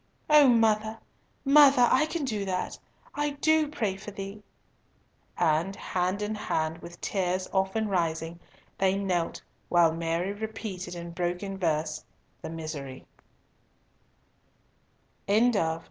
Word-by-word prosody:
"O 300 Hz, -2 st, +8 dB
mother, 220 Hz, -2 st, +2 dB, 0.5 s
mother, 275 Hz, -3 st, +7 dB
I 310 Hz, -, +4 dB
can 315 Hz, -2 st, -3 dB
do 215 Hz, -6 st, -2 dB
that. 185 Hz, -1 st, -3 dB, 0.3 s
I 295 Hz, -1 st, -2 dB
do 315 Hz, 0 st, +3 dB
pray 215 Hz, -10 st, -2 dB
for 195 Hz, -, -9 dB
thee." 200 Hz, +1 st, -7 dB, 1.0 s
And 165 Hz, +5 st, +1 dB
hand 185 Hz, +3 st, -2 dB
in 210 Hz, +1 st, -2 dB
hand 160 Hz, -6 st, -2 dB
with 170 Hz, 0 st, -11 dB
tears 185 Hz, -1 st, -1 dB
often 190 Hz, +3 st, +1 dB
rising, 165 Hz, -3 st, -1 dB, 0.4 s
they 190 Hz, 0 st, +2 dB
knelt 180 Hz, -4 st, -1 dB, 0.3 s
while 170 Hz, -2 st, +5 dB
Mary 165 Hz, +3 st, -1 dB
repeated 205 Hz, -4 st, -6 dB
in 170 Hz, 0 st, -7 dB
broken 180 Hz, +3 st, -3 dB
voice 155 Hz, -4 st, -1 dB, 0.4 s
the -, -, -6 dB
Miserere. 155 Hz, -5 st, -7 dB
190 Hz, 115 wpm, -28 LUFS, 170-220 Hz, 1.0 s, O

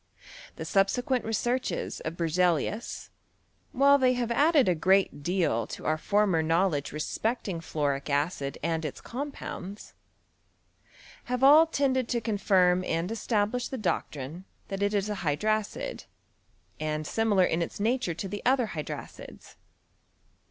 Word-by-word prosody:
The -, -, -6 dB
subsequent 245 Hz, +7 st, +1 dB
researches 240 Hz, +3 st, -1 dB
of 160 Hz, +2 st, -5 dB
Berze 170 Hz, 0 st, -1 dB
lius, 180 Hz, -, 0 dB, 0.6 s
while 280 Hz, +2 st, +5 dB
they 255 Hz, -1 st, +4 dB
have 240 Hz, -1 st, -2 dB
added 290 Hz, -, +4 dB
a 180 Hz, -, +4 dB
great 190 Hz, -1 st, +2 dB
deal 160 Hz, -, 0 dB
to -, -, -8 dB
our 155 Hz, 0 st, +1 dB
former 200 Hz, -3 st, +2 dB
knowledge 165 Hz, -2 st, +1 dB
respecting 195 Hz, +4 st, -2 dB
fluoric 145 Hz, -3 st, -2 dB
acid 140 Hz, -1 st, -1 dB
and 165 Hz, 0 st, -1 dB
its 150 Hz, -, -5 dB
com 285 Hz, +4 st, -5 dB
pounds, 200 Hz, -6 st, -8 dB, 1.3 s
have 250 Hz, +1 st, -2 dB
all 305 Hz, +4 st, +8 dB
tended 265 Hz, -5 st, +1 dB
to 240 Hz, -, 0 dB
confirm 190 Hz, -4 st, +2 dB
and 170 Hz, +3 st, -2 dB
establish 225 Hz, +1 st, 0 dB
the 265 Hz, -, -5 dB
doctrine 170 Hz, -, -3 dB, 0.2 s
that 195 Hz, 0 st, -4 dB
it 205 Hz, +1 st, +1 dB
is 200 Hz, 0 st, 0 dB
a 210 Hz, -2 st, -4 dB
hydracid, 210 Hz, +8 st, -1 dB, 0.7 s
and 155 Hz, 0 st, -2 dB
similar 210 Hz, 0 st, +2 dB
in 165 Hz, 0 st, 0 dB
its 170 Hz, -, -4 dB
nature 225 Hz, -5 st, 0 dB
to 195 Hz, -, -4 dB
the 205 Hz, +2 st, -5 dB
other 250 Hz, -3 st, +2 dB
hydracids. 155 Hz, -3 st, -8 dB
195 Hz, 140 wpm, -28 LUFS, 165-240 Hz, 1.3 s, all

